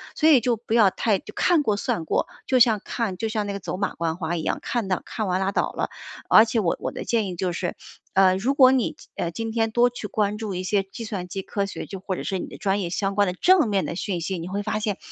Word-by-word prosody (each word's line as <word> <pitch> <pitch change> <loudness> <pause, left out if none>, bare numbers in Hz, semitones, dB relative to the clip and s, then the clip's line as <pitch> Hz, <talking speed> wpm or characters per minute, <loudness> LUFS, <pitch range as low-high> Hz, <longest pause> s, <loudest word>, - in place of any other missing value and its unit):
所 315 - +4
以 290 -5 +7
就 240 +1 +1
不 225 0 -3
要 210 -5 +6
太 210 0 +1 0.2
看 340 -4 +3
过 215 -6 +1
算 175 -4 -2
过， - - 0 0.2
就 255 - +2
像 225 -3 +5
看 220 -6 -2
就 225 - -2
像 215 -2 -2
那 200 - -3
个 200 - -4
走 180 - -5
马 200 0 -2
观 165 -1 -1
花 170 -1 -3
一 160 - -4
样， - - -1
看 235 -5 -2
到 185 -1 0
看 215 - -3
完 185 0 +1
拉 195 +1 0
倒 - - 0
了， - - -3 0.4
而 220 - +8
且 225 0 0
我 175 -6 0
我 - - -3
的 - - -6
建 225 -3 +1
议 180 - -5
就 180 +1 -1
是， 175 0 -3 0.4
呃， 190 -1 +5
如 240 +8 +1
果 260 -2 +7
你， 260 -3 +1 0.2
呃， 170 - -2
今 225 +6 -4
天 225 0 0
多 240 +2 +4
去 245 -3 -7
关 210 0 0
注 215 -2 -4
一 180 - -3
些 195 +1 +1
计 195 +4 -9
算 195 -5 -4
机 195 +2 -4
科 200 +1 -2
学， 195 - -6
就 195 - -7
或 190 0 -3
者 - - -5
是 195 - -2
你 - - -4
的 - - -10
专 200 0 +1
业 175 - -3
相 195 +2 -1
关 205 0 +3
的 180 - -1
正 355 - +4
面 195 -2 +1
的 - - -4
讯 180 0 -3
息， 185 +3 -2
你 165 - -6
会 200 +2 -2
发 215 0 -1
现， 210 -2 -2
200 Hz, 305 characters per minute, -24 LUFS, 185-225 Hz, 0.4 s, 而